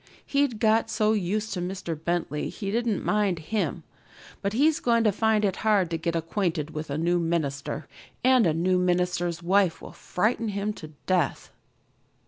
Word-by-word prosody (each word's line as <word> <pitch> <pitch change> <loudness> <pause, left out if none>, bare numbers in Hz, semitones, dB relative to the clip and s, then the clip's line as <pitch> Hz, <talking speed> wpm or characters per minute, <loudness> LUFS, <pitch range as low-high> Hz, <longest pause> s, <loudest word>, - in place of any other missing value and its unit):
He'd 280 -5 +1
got 225 0 +3
so 215 -1 +2
used 210 +2 -1
to 180 - -3
Mr. 180 -1 -4
Bentley 160 -2 -2
he 195 -2 -5
didn't 230 -1 0
mind 205 -4 +1
him, 200 +7 -2 0.6
but 200 0 -1
he's 300 +6 +3
going 235 -1 +2
to 215 - +4
find 215 +1 +2
it 195 -2 0
hard 200 -6 +2
to 165 - 0
get 170 +1 -1
acquainted 165 -2 -1
with 155 -1 -5
a 140 - -2
new 175 +2 +1
minister, 155 -3 -2 0.4
and 255 -5 +5
a 160 - +2
new 180 +2 +2
minister's 175 -1 0
wife 190 -1 +2
will - - -10
frighten 220 +4 -1
him 205 +1 -2
to 160 - -9 0.2
death." 180 -7 0
185 Hz, 170 wpm, -26 LUFS, 170-215 Hz, 0.6 s, and